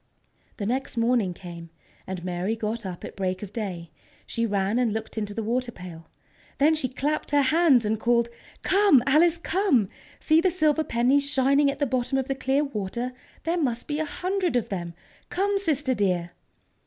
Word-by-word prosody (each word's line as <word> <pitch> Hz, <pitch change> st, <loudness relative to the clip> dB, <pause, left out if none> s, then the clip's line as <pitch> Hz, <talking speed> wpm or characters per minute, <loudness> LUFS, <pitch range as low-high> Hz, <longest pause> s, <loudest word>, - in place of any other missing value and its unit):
The 205 Hz, -, -3 dB
next 250 Hz, +2 st, -2 dB
morning 230 Hz, -4 st, +2 dB
came, 170 Hz, -2 st, -9 dB, 0.4 s
and 185 Hz, -2 st, -5 dB
Mary 180 Hz, +4 st, -1 dB
got 220 Hz, -1 st, -3 dB
up 180 Hz, -2 st, -7 dB
at -, -, -9 dB
break 185 Hz, 0 st, -2 dB
of 200 Hz, -, -8 dB
day. 180 Hz, -8 st, -5 dB, 0.3 s
She 230 Hz, 0 st, -1 dB
ran 200 Hz, +2 st, 0 dB
and 240 Hz, -3 st, +2 dB
looked 220 Hz, +1 st, -5 dB
into 210 Hz, -2 st, -3 dB
the 225 Hz, -, -2 dB
water 240 Hz, +3 st, -1 dB
pail. 175 Hz, -5 st, -10 dB, 0.5 s
Then 300 Hz, +3 st, +4 dB
she 300 Hz, -5 st, -1 dB
clapped 290 Hz, +4 st, -2 dB
her 285 Hz, 0 st, +3 dB
hands 280 Hz, -4 st, +4 dB
and 215 Hz, 0 st, 0 dB
called: 235 Hz, 0 st, +2 dB, 0.4 s
"Come, 385 Hz, -10 st, +5 dB
Alice, 320 Hz, +5 st, +4 dB
come! 340 Hz, -, +1 dB, 0.3 s
See 315 Hz, +1 st, +4 dB
the 370 Hz, -, +3 dB
silver 315 Hz, -3 st, +2 dB
pennies 270 Hz, +3 st, +2 dB
shining 275 Hz, +1 st, +3 dB
at 275 Hz, -, -3 dB
the 285 Hz, -, +1 dB
bottom 255 Hz, +1 st, 0 dB
of 265 Hz, -1 st, -1 dB
the 270 Hz, -, 0 dB
clear 270 Hz, +2 st, +1 dB
water! 240 Hz, -1 st, -4 dB, 0.3 s
There 335 Hz, +2 st, 0 dB
must 240 Hz, -5 st, -1 dB
be 295 Hz, 0 st, -2 dB
a 315 Hz, -, 0 dB
hundred 365 Hz, +1 st, -1 dB
of 245 Hz, -, 0 dB
them! 175 Hz, -3 st, -4 dB, 0.3 s
Come, 395 Hz, +2 st, 0 dB
sister, 295 Hz, -8 st, +1 dB
dear!" 180 Hz, -6 st, 0 dB
245 Hz, 185 wpm, -26 LUFS, 205-295 Hz, 0.5 s, Come